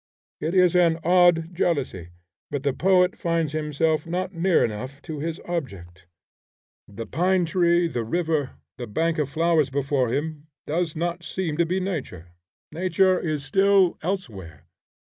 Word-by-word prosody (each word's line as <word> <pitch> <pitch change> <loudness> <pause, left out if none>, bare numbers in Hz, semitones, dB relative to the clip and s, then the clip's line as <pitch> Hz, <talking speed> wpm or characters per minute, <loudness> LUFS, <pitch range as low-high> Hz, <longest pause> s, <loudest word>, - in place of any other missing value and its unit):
It 165 +4 -2
is 180 -2 +4
an 170 -2 +4
odd 175 -1 +4
jealousy, 140 - -1 0.4
but 140 -2 -4
the 140 -2 +1
poet 180 +3 +3
finds 165 -3 -1
himself 155 +1 0
not 185 +3 -3
near 175 +1 +2
enough 130 +6 -6
to 155 -3 -6
his 160 +2 -4
object. 95 - -6 0.8
The 110 +3 -7
pine 180 +6 +1
tree, 170 0 +2
the 125 -7 -3
river, 155 +1 -1 0.2
the 120 - -5
bank 160 +9 -1
of 145 -3 0
flowers 160 -2 +2
before 135 -2 0
him, 150 +2 -3 0.2
does 160 +1 -2
not 170 +2 -3
seem 165 0 -3
to 170 -1 +2
be 185 +3 0
nature. 135 - -5 0.4
Nature 185 +3 +2
is 155 -4 -3
still 195 -1 +3
elsewhere. 110 - -5
165 Hz, 145 wpm, -24 LUFS, 140-175 Hz, 0.8 s, is